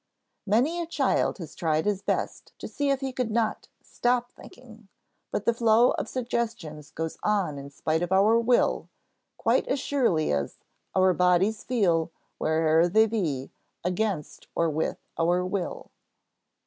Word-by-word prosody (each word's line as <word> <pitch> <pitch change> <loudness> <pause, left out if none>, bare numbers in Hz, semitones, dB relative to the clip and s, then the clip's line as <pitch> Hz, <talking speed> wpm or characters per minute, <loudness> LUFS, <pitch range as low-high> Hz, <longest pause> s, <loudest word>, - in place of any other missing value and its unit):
Many 265 - +2
a 335 - -4
child 290 -5 +1
has 170 -5 -8
tried 160 -2 0
his 205 -2 0
best - - -3
to - - -7
see 285 -1 -2
if 275 0 +1
he 265 -1 -3
could 250 -2 -1
not 225 0 -1 0.2
"stop 245 0 0
thinking," 225 -4 -15 0.4
but 205 - -3
the 235 - +3
flow 230 +1 +4
of - - -3
suggestions 230 - -3
goes 160 +1 -5
on 195 -9 0
in 140 0 -9
spite 155 +3 -1
of 175 +1 -2
our 200 +4 +5
will, 240 +1 +2 0.5
quite - - +1
as 270 - 0
surely 235 - +1
as 70 -1 -2 0.4
"our 185 -1 +4
bodies 180 +4 +2
feel, 180 -10 +1 0.3
where'er 160 +1 +3
they 220 +5 +4
be, 165 - -2 0.3
against 180 -3 -2
or 165 -1 +1
with 155 +2 -1 0.2
our 175 +2 +2
will." 185 0 -4
200 Hz, 150 wpm, -26 LUFS, 165-235 Hz, 0.5 s, our